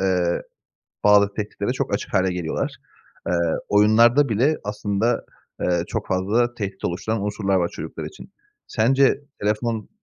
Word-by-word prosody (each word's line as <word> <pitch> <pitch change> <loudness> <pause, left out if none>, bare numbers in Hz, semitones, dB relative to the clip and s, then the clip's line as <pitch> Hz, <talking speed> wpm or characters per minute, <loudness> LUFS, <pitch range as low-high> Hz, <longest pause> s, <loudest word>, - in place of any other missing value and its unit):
eee, 90 -2 +1 0.6
bazı 100 -1 +5
tehditlere 105 -1 -3
çok - - -2
açık - - -4
hâle 95 -1 +2
geliyorlar. 85 -3 -2 0.5
Eee, 90 - +1 0.3
oyunlarda 115 +7 +5
bile 130 +8 +2
aslında, 105 +3 -1 0.4
eee, 85 -1 +1
çok 110 -2 -3
fazla 110 +6 +1
tehdit 100 -3 -5
oluşturan 100 +4 -2
unsurlar 100 -2 0
var 85 -1 +1
çocuklar - - -7
için. - - -11 0.3
Sence 135 +4 +3 0.2
telefon 110 +2 -1
105 Hz, 130 wpm, -23 LUFS, 95-115 Hz, 0.6 s, bazı